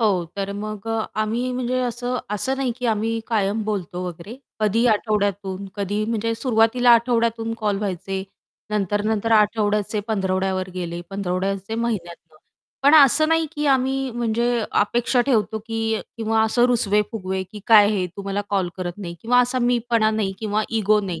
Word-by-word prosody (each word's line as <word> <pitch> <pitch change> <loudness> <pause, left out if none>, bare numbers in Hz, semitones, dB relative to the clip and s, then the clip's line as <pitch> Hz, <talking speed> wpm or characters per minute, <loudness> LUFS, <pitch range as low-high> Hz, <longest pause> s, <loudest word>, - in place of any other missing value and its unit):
हो, 195 -6 +2
तर 200 0 -3
मग 210 0 -6
अ, 225 -1 0 0.2
आम्ही 230 +4 -1
म्हणजे 255 0 -1
असं 245 +1 -2
असं 260 +6 -1
नाही 265 -2 -1
की 250 - -2
आम्ही 225 +1 0
कायम 215 -1 0
बोलतो 185 -4 -3
वगैरे, 180 +7 -8 0.2
कधी 220 +3 +2
आठवड्यातून 200 -3 0
कधी 205 +1 -2
म्हणजे 230 0 -1
सुरुवातीला 230 +1 +3
आठवड्यातून 230 -1 +1
कॉल 205 -2 0
व्हायचे, 195 -1 -3 0.5
नंतर-नंतर 210 +2 0
आठवड्याचे 210 -1 +2
पंधरवड्यावर 190 -2 -1
गेले, 175 -1 -4
पंधरवड्याचे 195 +2 -2
महिन्यातनं. 175 -8 -4 0.5
पण 285 +3 +6
असं 310 +1 +6
नाही 325 0 +2
की 295 -1 -2
आम्ही 265 0 +1
म्हणजे 235 0 0 0.2
अपेक्षा 240 +4 +1
ठेवतो 220 -4 +1
की 225 -1 -1 0.2
किंवा 225 0 +1
असं 220 +2 +3
रुसवे-फुगवे, 210 -4 0
की 195 +3 -11
"काय 210 -2 +7
हे 195 -4 0
तू 200 - -6
मला 195 +1 -2
कॉल 195 -3 +1
करत 180 0 -5
नाही" 175 -4 -6
किंवा 245 +2 +4
असा 250 +1 0
मी 245 0 +2
पणा 220 -2 +3
नाही 215 -3 -1
किंवा 215 -1 -1 0.2
इगो 210 0 +3
नाही 180 -5 -5
215 Hz, 160 wpm, -22 LUFS, 195-235 Hz, 0.5 s, काय